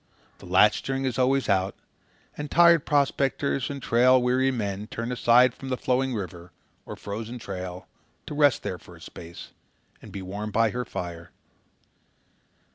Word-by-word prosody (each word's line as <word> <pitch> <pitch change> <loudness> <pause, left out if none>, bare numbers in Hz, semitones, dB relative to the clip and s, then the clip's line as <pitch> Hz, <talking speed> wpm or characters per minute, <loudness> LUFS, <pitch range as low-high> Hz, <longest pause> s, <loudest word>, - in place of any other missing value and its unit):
The - - -12
latchstring 105 +8 +2
is 130 -1 -2
always 135 +1 +2
out, 95 0 +1 0.6
and 150 0 -6
tired 170 -1 +5
prospectors 140 -2 +1
and 140 -1 -5
trail 125 +2 +4
weary 125 +2 +2
men 105 -5 -3
turn 115 +2 -5
aside 125 0 +4
from 135 - -9
the 130 - -1
flowing 130 0 0
river 90 -3 -7 0.4
or - - -6
frozen 110 +4 -6
trail 95 -4 -7 0.4
to - - -7
rest 145 -3 +3
there - - -4
for - - -15
a - - -17
space 85 +1 -11 0.5
and - - -12
be 95 - -6
warm 100 +3 -5
by 110 +1 +2
her 125 +2 -3
fire. 85 -1 -6
120 Hz, 155 wpm, -26 LUFS, 100-135 Hz, 0.6 s, tired